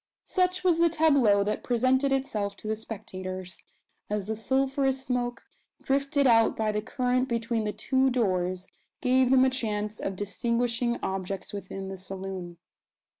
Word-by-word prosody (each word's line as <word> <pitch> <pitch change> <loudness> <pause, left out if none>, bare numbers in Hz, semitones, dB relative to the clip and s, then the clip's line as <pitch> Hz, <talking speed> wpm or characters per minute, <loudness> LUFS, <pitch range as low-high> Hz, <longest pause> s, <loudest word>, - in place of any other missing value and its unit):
Such 365 0 +1
was 350 -3 +3
the 340 0 +5
tableau 280 -11 +4
that 210 +1 -2
presented 255 +3 +2
itself 210 -7 -1
to 215 - -9
the 220 - 0
spectators, 185 -4 -7 0.5
as 210 -2 -1
the 220 +2 -2
sulphurous 265 +3 0
smoke, 245 -1 -2 0.4
drifted 275 +1 +1
out 230 -3 +4
by 220 -1 +1
the 210 0 -1
current 255 +3 0
between 230 -1 -1
the 210 - 0
two 265 +4 +1
doors, 185 -7 0 0.4
gave 255 -1 +3
them 260 0 +6
a - - +4
chance 215 -4 -2
of 195 - -3
distinguishing 235 +4 -1
objects 190 +1 -3
within 195 -1 -6
the 195 - -6
saloon. 185 -2 -6
230 Hz, 150 wpm, -28 LUFS, 200-260 Hz, 0.5 s, them